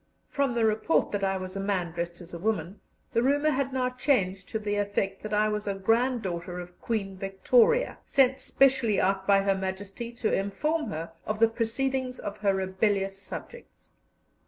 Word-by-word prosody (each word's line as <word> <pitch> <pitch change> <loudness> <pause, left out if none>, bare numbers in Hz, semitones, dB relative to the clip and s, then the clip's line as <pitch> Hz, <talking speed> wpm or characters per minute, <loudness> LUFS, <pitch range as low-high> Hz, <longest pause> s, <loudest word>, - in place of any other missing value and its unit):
From 280 -4 0
the 230 -1 +3
report 220 +8 +2
that 205 -1 -2
I 195 0 +1
was 185 0 -6
a - - -2
man 195 -4 -1
dressed 170 +1 -4
as 175 0 -13
a 170 - -5
woman, 190 -1 -2 0.3
the 230 - +3
rumour 290 +4 +3
had 270 -1 0
now 255 -1 0
changed 195 -8 0
to - - -1
the 205 -1 -2
effect 200 -1 -1
that 215 - -6
I 210 0 +3
was 210 0 -2
a 200 - 0
granddaughter 195 -5 0
of 180 0 -10
Queen 200 -4 -2
Victoria, 455 - +2
sent 265 -2 +3
specially 260 -6 +3
out 190 0 +1
by 195 -1 +5
Her 195 0 +3
Majesty 195 +4 -5
to 235 -2 -1
inform 300 +12 0
her 165 +1 -5 0.2
of 215 - -1
the 225 - +6
proceedings 250 +3 -1
of 205 - -6
her 200 -2 +2
rebellious 195 +1 0
subjects. 480 - -10
205 Hz, 180 wpm, -28 LUFS, 190-250 Hz, 0.3 s, the